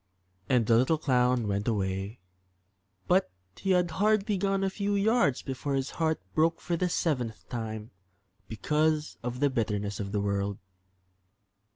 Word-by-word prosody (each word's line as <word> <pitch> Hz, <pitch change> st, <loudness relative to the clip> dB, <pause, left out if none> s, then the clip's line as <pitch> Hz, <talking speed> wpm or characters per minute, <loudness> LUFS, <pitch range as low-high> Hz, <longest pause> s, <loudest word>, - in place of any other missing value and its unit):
And 125 Hz, -3 st, +3 dB
the 115 Hz, +1 st, +4 dB
little 130 Hz, +7 st, +3 dB
clown 125 Hz, -5 st, +2 dB
went 100 Hz, +1 st, -1 dB
away; 95 Hz, -1 st, -2 dB, 0.9 s
but 185 Hz, +2 st, +3 dB, 0.3 s
he 195 Hz, -, -4 dB
had 180 Hz, -2 st, +3 dB
hardly 210 Hz, +3 st, +2 dB
gone 195 Hz, 0 st, 0 dB
a 195 Hz, -, +2 dB
few 200 Hz, +1 st, -1 dB
yards 200 Hz, -, +2 dB
before 135 Hz, +1 st, -3 dB
his 135 Hz, 0 st, -1 dB
heart 160 Hz, -1 st, 0 dB
broke 165 Hz, +1 st, +2 dB
for 175 Hz, -, -2 dB
the 180 Hz, +2 st, 0 dB
seventh 125 Hz, -10 st, -1 dB
time 110 Hz, -2 st, -5 dB, 0.6 s
because 150 Hz, +7 st, 0 dB
of 125 Hz, +2 st, -4 dB
the 145 Hz, -1 st, +3 dB
bitterness 105 Hz, -4 st, -1 dB
of 100 Hz, -1 st, -4 dB
the 105 Hz, -, 0 dB
world. 100 Hz, 0 st, -1 dB
130 Hz, 150 wpm, -29 LUFS, 110-175 Hz, 0.9 s, the